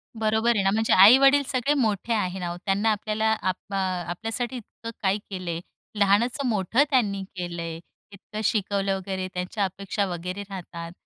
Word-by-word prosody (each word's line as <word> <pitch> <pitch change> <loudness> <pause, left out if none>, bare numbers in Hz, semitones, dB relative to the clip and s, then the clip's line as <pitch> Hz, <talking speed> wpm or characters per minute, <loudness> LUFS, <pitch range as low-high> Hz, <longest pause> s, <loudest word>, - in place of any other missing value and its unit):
बरोबर 220 +2 +2
आहे 195 - +1
ना, 195 - +3
म्हणजे 220 +1 +2
आई-वडील 270 +9 +8
सगळे 260 +3 +1
मोठे 220 +1 0
आहे 190 -3 -1
ना 175 -1 -3
ओ. - - -8
त्यांना 200 +3 +2
आपल्याला 215 +1 -1 0.2
आप 185 -1 0 0.2
अ, - - 0 0.3
आपल्यासाठी 225 +7 -3
इतकं 230 0 -10
काय 195 +1 +2
केलं 185 -3 -5
आहे, 165 +1 -4 0.4
लहानाचं 235 +7 +2
मोठं 220 +5 +2
त्यांनी 205 -8 +1
केलं 175 -2 -4
आहे, 165 0 -5 0.3
इतकं 210 +2 -8
शिकवलं 200 -2 0
वगैरे, 190 0 -4
त्यांच्या 180 +3 -2
अपेक्षा 195 +2 -2
वगैरे 180 +2 -5
राहतात 170 -3 -7
200 Hz, 170 wpm, -25 LUFS, 185-225 Hz, 0.4 s, आई-वडील